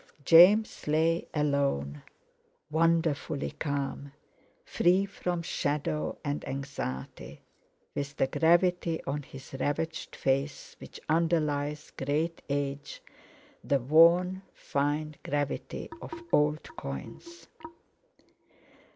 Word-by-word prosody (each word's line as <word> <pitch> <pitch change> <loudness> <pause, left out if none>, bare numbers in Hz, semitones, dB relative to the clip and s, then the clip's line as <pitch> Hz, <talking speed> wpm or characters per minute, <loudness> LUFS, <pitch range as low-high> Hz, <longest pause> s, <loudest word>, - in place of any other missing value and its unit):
James 185 +7 +6
lay 160 +2 +2
alone, 140 - 0 0.7
wonderfully 160 -3 +1
calm, 140 -1 -4 0.5
free 185 +3 +3
from 180 -3 -3
shadow 150 0 -2
and 145 0 -2
anxiety, 135 - -6 0.5
with 145 0 -4
the - - +3
gravity 170 +2 +2
on 145 +2 -3
his 135 -1 -12
ravaged 160 +4 -2
face 135 +2 -1
which - - -11
underlies 150 -2 0
great 155 +5 -2
age, 145 - -3 0.6
the 140 - +2
worn 170 +7 +5
fine 145 +2 -2
gravity 145 -1 -3
of - - -8 0.2
old 150 +1 +3
coins. 340 +1 -8
150 Hz, 90 wpm, -29 LUFS, 140-165 Hz, 0.7 s, James